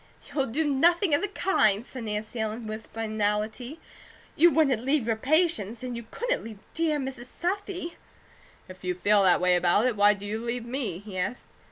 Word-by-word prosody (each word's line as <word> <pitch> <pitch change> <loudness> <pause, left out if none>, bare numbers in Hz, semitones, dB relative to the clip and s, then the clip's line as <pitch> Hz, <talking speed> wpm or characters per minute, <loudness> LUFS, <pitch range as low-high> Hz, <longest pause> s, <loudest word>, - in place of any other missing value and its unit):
"You'll 270 -2 0
do 305 +8 -1
nothing 335 +5 +3
of 290 - +3
the 410 - 0
kind," 235 - +2
said 255 -4 -8
Nancy 215 +2 -4
Ellen, 220 +1 -3
with 215 0 -6
finality. 220 +5 -2 0.6
"You 345 +3 +6
wouldn't 275 -8 +2
leave 270 -2 +1
your 225 -1 +1
patients, 255 - +1
and 250 -1 -4
you 235 -1 -7
couldn't - - -2
leave 220 -2 -8 0.2
dear 320 -2 +1
Mrs. 260 -3 -5
Southey." 360 +1 -4 0.7
"If 185 0 -13
you 180 0 -1
feel 205 +3 +3
that 185 -3 +5
way 180 0 +4
about 175 +5 +3
it, 250 -3 +1
why 205 0 +5
do 200 0 -9
you 220 +2 -4
leave 235 0 -3
me?" 235 -8 -2
he 195 -1 -7
asked. 200 +7 -4
235 Hz, 190 wpm, -27 LUFS, 210-295 Hz, 0.7 s, You